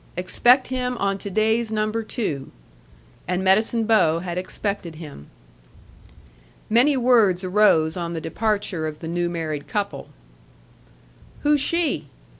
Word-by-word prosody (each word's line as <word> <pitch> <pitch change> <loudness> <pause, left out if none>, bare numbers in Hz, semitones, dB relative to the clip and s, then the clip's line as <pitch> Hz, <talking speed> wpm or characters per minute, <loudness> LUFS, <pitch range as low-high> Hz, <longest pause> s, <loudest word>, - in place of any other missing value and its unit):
Expect 240 +9 +3
him 250 -1 -2
on 195 -1 -1
to 200 - -6
day's 220 +3 +1
number 215 +1 -1
two." 180 - -4 0.8
And 180 +1 -1
Medicine 220 +4 +3
Bow 185 -8 +3
had 175 0 -5
expected 185 -1 -4
him. 150 - -11 1.4
Many 260 +5 +4
words 225 -7 +3
arose 180 -5 +3
on 170 -2 -4
the 165 - -3
departure 195 -1 -2
of 155 -1 -6
the 165 - -8
new 175 +1 -1
married 155 -4 -4
couple. 205 -1 -4 1.3
"Who's 295 -1 +3
she?" 295 - 0
200 Hz, 125 wpm, -23 LUFS, 170-225 Hz, 1.4 s, Many